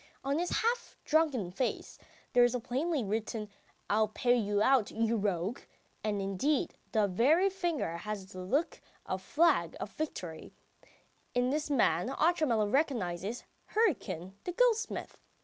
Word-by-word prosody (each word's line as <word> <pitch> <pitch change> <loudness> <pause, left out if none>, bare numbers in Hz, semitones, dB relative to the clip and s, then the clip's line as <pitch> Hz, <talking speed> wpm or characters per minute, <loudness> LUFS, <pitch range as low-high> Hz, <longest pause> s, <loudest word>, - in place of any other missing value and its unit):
On 280 +3 0
his 350 - -1
half 475 +1 -1
drunken 290 - +2
face 245 +7 -3 0.3
there 245 - +6
is 245 +1 +3
plainly 275 +3 0
written: 215 +1 -3 0.4
"I'll 215 +1 +3
pay 245 +3 +2
you 205 -3 +1
out, 265 -6 +4
you 225 +1 0
rogue!" 200 +1 -1 0.4
and 210 -1 0
indeed 195 +10 0 0.2
the 215 -2 +3
very 300 - +3
finger 340 - -2
has 210 +1 -5
the 185 - -8
look 290 - -1 0.2
of 185 - -2
a - - -20
flag 295 - +2
of 205 - -5
victory. 180 - -6 0.8
In 245 +1 +2
this 300 +1 -1
man 230 - +2
Otchumyelov 270 -9 +2
recognises 225 - 0 0.3
Hryukin, 240 - 0
the 355 - -4
goldsmith. 455 0 +1
245 Hz, 140 wpm, -31 LUFS, 205-310 Hz, 0.8 s, there